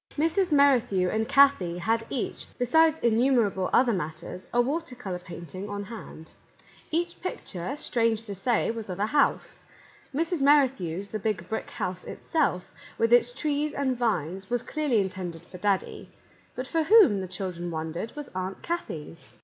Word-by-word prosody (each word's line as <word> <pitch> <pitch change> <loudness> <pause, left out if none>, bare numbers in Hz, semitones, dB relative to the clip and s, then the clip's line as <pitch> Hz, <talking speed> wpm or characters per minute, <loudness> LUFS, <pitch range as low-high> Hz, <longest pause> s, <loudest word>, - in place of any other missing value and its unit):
Mrs. 330 +4 +1
Merrithew 250 -10 +4
and 220 0 -1
Kathie 275 -12 +4
had 225 +5 0
each, 255 - -4
be 245 - 0
sides 320 +4 +4
innumerable 230 -5 +2
other 245 -2 +4
matters, 170 +1 -5
a 240 - +1
water 280 +2 0
colour 190 -7 -5
painting 180 +2 -8
on 205 0 -4
hand. 200 -6 -10 0.6
Each 345 +2 -2
picture, 225 - -5
strange 230 -6 0
to 205 -3 -6
say, 225 +4 +1
was 225 -3 -7
of 180 +1 -5
a 205 - +2
house. 285 +5 +1 0.5
Mrs. 330 +2 -1
Merrithew's, 255 - +3
the 215 - -4
Big 215 0 -2
Brick 220 - -4
House 185 0 -4
itself, 280 - -1 0.3
with 230 +1 +2
its 240 0 +5
trees 295 +3 -1
and 270 -2 0
vines, 195 -6 -1
was 245 0 0
clearly 295 -7 0
intended 185 -4 -4
for 180 +1 -12
Daddy; 200 -1 -1 0.5
but 255 - -4
for 320 +4 0
whom, 375 - +6
the 185 - -4
children 180 -1 -5
wondered, 160 +6 -4
was 295 -2 -6
Aunt 185 +1 -4
Kathie's 165 - -5
225 Hz, 160 wpm, -27 LUFS, 185-275 Hz, 0.6 s, whom